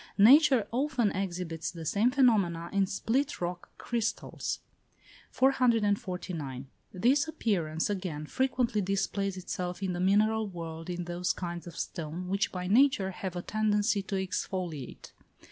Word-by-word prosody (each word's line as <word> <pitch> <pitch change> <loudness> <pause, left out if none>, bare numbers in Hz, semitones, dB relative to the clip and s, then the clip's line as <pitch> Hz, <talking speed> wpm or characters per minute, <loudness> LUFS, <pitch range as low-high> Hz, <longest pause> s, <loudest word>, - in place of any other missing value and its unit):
Nature 260 +2 +7
often 250 -4 +1
exhibits 175 -4 -3
the 165 -2 -8
same 210 +9 +3
phenomena 200 -11 +2
in 195 -1 +2
split 245 +8 -1
rock 175 0 -4
crystals. 230 -2 -2 0.7
449. 200 - +1 0.3
This 260 - +2
appearance, 175 - -1
again, 180 -7 -3
frequently 245 - 0
displays 195 0 -1
itself 180 0 -4
in 185 -2 -1
the 175 - -3
mineral 215 +4 +3
world 165 -2 -7
in 175 0 -3
those 175 +1 -1
kinds 175 -1 -5
of 170 - -9
stone 170 +3 -4
which 195 +2 0
by 180 -1 -4
nature 210 -2 +4
have 185 -1 -5
a 175 - -4
tendency 210 -1 +1
to 195 +1 -4
exfoliate. 180 -6 -4
195 Hz, 130 wpm, -30 LUFS, 175-225 Hz, 0.7 s, Nature